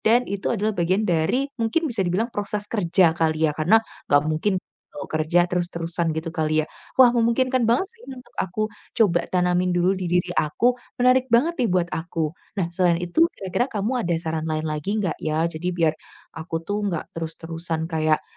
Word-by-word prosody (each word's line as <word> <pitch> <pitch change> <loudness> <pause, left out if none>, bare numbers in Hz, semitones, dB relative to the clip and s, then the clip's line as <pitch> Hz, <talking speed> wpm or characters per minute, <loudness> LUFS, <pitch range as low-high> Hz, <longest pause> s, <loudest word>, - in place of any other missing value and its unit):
dan 240 +3 +3
itu 200 0 -3
adalah 215 -1 0
bagian 185 +3 +1
dari 210 - +1
mungkin 230 +9 +1
bisa 235 -8 -1
dibilang 195 +6 0
proses 205 0 -2
kerja 185 -5 +3
kali 160 -1 0
ya, 150 - +3
karena 160 +8 +4 0.3
nggak 145 +1 +4
mungkin 160 +6 0 0.4
mau 195 - -6
kerja 160 +3 +2
terus-terusan, 170 -1 -1
gitu 160 +1 -3
kali 155 -1 +1
ya. - - -7 0.3
Wah, 255 -2 +7
memungkinkan 240 +1 +2
banget 240 +12 +2
sih 465 0 -18
untuk 255 -2 -10
aku 190 +4 -1 0.3
coba 190 -7 +2
tanamin 180 0 +1
dulu 175 +1 +3
di 185 - -3
diri 175 +1 +1
aku. 240 +11 +1 0.2
Menarik 255 +1 +4
banget 325 +8 +3
nih 245 - +2
buat 180 -3 0
aku. 160 -1 -2 0.3
Nah, 170 - -2
selain 175 -1 +1
itu 180 - +3
kira-kira 195 +5 -1
kamu 230 -1 -2
ada 175 - +1
saran 160 0 -2
lain 155 0 -1
lagi 155 +6 -2
nggak 185 -4 -2
ya? 160 +2 0
Jadi 160 +2 -6
biar 165 -3 +2 0.5
aku 160 +1 -7
tuh 205 +5 -2
nggak 170 -5 -3
terus-terusan 165 0 -5
kayak 155 -1 +1
180 Hz, 185 wpm, -23 LUFS, 160-220 Hz, 0.5 s, Wah